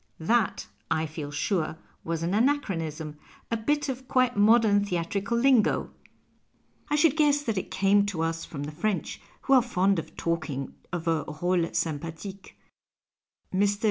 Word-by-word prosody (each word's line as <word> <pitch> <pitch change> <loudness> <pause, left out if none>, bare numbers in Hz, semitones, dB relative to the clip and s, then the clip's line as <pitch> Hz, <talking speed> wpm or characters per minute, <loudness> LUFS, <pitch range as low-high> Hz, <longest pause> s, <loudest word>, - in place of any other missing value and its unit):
That, 225 +6 +1 0.2
I 160 - +1
feel 155 -2 -6
sure, 160 0 -1 0.3
was 165 0 -2
an 175 +3 -1
ana 250 +8 +4
ehronism, 160 - -5 0.3
a - - +2
bit 290 +6 0
of 260 -1 -5
quite 255 -1 +2
modern 210 -1 +5
theatrical 200 +4 -1
lingo. 255 -2 +3 1.0
I 295 - +2
should 300 -1 +4
guess 290 -2 +3
that 225 -5 -1
it - - -7
eamc 200 +1 +3
to 170 -5 -2
us 165 0 -2
from 145 -3 -6
the 145 - -5
French, 205 +6 -2 0.2
who 275 - +2
are 260 - +7
fond 195 -5 +1
of 160 - -9
talking 155 -5 -2 0.2
of 175 -2 -4
a 160 -2 +1
role 175 +2 0
sympathique. 165 +5 -4 1.0
Mr. 200 +1 +2
195 Hz, 155 wpm, -27 LUFS, 165-235 Hz, 1.0 s, are